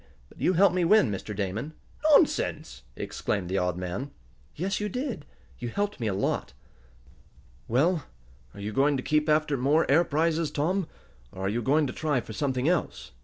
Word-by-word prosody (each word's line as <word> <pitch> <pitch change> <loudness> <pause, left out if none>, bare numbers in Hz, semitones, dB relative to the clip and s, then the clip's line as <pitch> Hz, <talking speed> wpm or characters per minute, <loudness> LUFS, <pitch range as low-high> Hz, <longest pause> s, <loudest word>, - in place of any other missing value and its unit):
But - - -16
you 185 - +3
helped 190 +2 +5
me 180 -1 +1
win, 170 - +5
Mr. 100 +1 -5
Damon." 105 +9 -3 0.4
"Nonsense!" 285 - +2
exclaimed 95 -3 -3
the 95 - +1
odd 90 -1 -1
man. 90 +10 -4 0.5
"Yes, 190 +5 -2
you 210 0 -2
did. 250 - -4 0.3
You 120 - -4
helped 205 - -2
me 115 - -1
a 100 - 0
lot." 100 - -1 1.1
"Well, 150 +6 +2 0.5
are - - -10
you 105 +1 -4
going 140 +4 +3
to 130 - -4
keep 150 +1 +1
after 150 -2 +2
more 145 +6 +3
air 160 +5 +6
prizes, 160 0 0
Tom, 180 +4 0 0.4
or 95 - -5
are - - +1
you 115 +4 -1
going 145 +6 +3
to 130 - -4
try 150 -4 0
for 115 -2 -8
something 130 +2 -1
else?" 175 -1 -1
145 Hz, 180 wpm, -27 LUFS, 110-170 Hz, 1.1 s, air